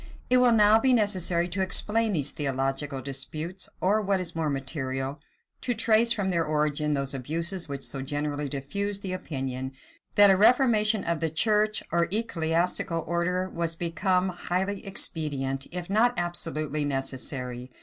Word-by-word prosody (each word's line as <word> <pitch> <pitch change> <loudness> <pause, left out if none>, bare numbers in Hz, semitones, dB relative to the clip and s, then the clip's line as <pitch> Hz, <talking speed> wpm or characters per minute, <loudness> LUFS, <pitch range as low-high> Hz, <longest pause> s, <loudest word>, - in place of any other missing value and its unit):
It 255 - +6
will 250 -1 +5
now 215 -1 +6
be 260 +2 +3
necessary 185 -6 +2
to 185 +2 -2
explain 215 +4 +2
these 145 -4 0
theological 135 -1 -2
disputes; 155 +7 -4
or, 205 +4 +2
what 200 -2 0
is 180 -2 -4
more 160 -2 -1
material, 135 0 -3 0.4
to 245 -2 -1
trace 225 +1 +3
from 200 -5 0
their 170 -2 +1
origin 150 -1 0
those 140 0 -2
abuses 165 +6 -1
which 140 -1 -5
so 135 - -2
generally 145 +1 -3
diffused 200 +9 -2
the 185 -2 -3
opinion, 130 -6 -4 0.4
that 205 -1 +8
a - - +5
reformation 220 -2 +4
of 170 -1 -1
the 165 - 0
church 210 +6 +2
or 170 0 +2
ecclesiastial 170 -4 0
order 175 +2 0
was 170 -2 -3
become 180 +3 0
highly 185 +2 -3
expedient, 140 -7 -1
if 175 0 -5
not 230 +5 +2
absolutely 155 -4 -2
necessary. 130 -2 -3
170 Hz, 150 wpm, -27 LUFS, 145-200 Hz, 0.4 s, that